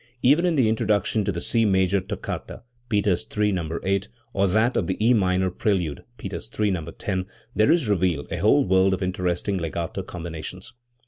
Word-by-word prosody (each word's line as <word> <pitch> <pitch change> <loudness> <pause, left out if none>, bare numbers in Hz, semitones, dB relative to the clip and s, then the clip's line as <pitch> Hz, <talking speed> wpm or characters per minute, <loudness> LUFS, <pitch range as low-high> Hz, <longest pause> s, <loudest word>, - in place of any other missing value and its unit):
Even 150 +8 +5
in 170 - +1
the 130 -6 +3
introduction 110 -1 +1
to 100 - 0
the 85 - -4
C 115 +6 +1
major 95 -1 +2
toccata 100 +3 -6 0.3
(Peters 105 -1 +1
III, 105 0 +3
No. 85 -3 -2
8), 100 +1 0 0.3
or 100 0 +2
that 110 +6 +2
of - - +1
the 95 - -1
E 115 +3 +4
minor 95 -3 +2
prelude 90 - -1
(Peters - - -6
III, 105 -1 +3
No. 85 -4 -2
10), 95 +2 -3 0.3
there 110 0 +4
is 165 -8 +2
revealed 90 -7 0
a - - -2
whole 75 - +4
world 95 +1 +4
of 95 - -5
interesting 90 +1 -1
legato 85 +3 -3
combina 85 -3 -7
tions. 95 +4 -8
95 Hz, 190 wpm, -24 LUFS, 90-105 Hz, 0.3 s, Even